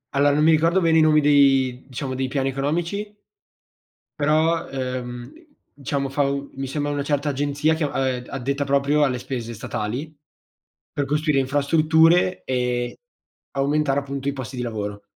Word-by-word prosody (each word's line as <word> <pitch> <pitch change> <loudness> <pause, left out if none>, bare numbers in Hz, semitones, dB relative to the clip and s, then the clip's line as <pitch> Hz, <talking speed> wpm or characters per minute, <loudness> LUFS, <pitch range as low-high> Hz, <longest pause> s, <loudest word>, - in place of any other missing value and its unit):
Alla 145 +1 +4
non 150 +2 +2
mi 160 - +6
ricordo 165 +4 +3
bene 165 -2 +3
i - - +6
nomi 155 -1 +5
dei 135 -3 +3
diciamo 130 0 -5
dei 130 0 -2
piani 135 0 -1
economici 170 +10 -3 1.0
però, 155 +3 +1
ehm, 125 -2 -5 0.4
diciamo 140 0 -3
fa 140 +2 0
mi 140 -1 -5
sembra 145 +2 -2
una 140 -1 -2
certa 145 0 -1
agenzia 145 +2 0
che, 160 - -2
ehm, 130 -3 -1
addetta 140 +2 -2
proprio 140 +2 +2
alle 130 -3 0
spese 120 -2 -5
statali 120 +8 -5 0.8
per 145 - -1
costruire 150 0 +1
infrastrutture 160 +6 +3
e 125 -1 -1 0.6
aumentare 140 0 +1
appunto 140 0 -4
i 140 - -2
posti 130 -1 -7
di 125 - -2
lavoro. 105 -3 -5
140 Hz, 150 wpm, -23 LUFS, 130-150 Hz, 1.0 s, mi